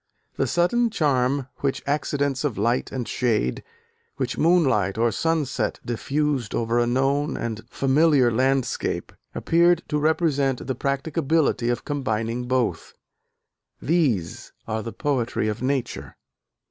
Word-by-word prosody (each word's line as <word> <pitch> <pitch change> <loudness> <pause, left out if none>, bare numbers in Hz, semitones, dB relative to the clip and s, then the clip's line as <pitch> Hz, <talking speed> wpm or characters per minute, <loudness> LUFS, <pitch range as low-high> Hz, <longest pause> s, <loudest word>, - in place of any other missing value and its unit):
The - - 0
sudden 235 +8 +2
charm 140 - +1
which 140 -1 -2
accidents 140 -2 -1
of 140 -7 -1
light 115 +5 0
and 125 -3 -4
shade, 110 - 0 0.5
which 130 -1 -2
moonlight 130 - +2
or 115 +1 +2
sunset 160 -3 -1
diffused 135 0 -1
over 115 +1 +1
a 120 - +2
known 135 +4 +1
and 110 -2 -4
familiar 135 -1 +3
landscape, 130 +1 0 0.2
appeared 170 0 +3
to 150 - 0
represent 145 -4 +1
the 130 - -1
practicability 140 0 0
of 120 -1 -2
combining 120 -4 -2
both. 125 -9 -1 0.8
These 130 - 0 0.2
are 110 0 -2
the 115 - -6
poetry 125 -7 -1
of 105 +2 -3
nature." 130 -1 -2
135 Hz, 120 wpm, -24 LUFS, 120-150 Hz, 0.8 s, familiar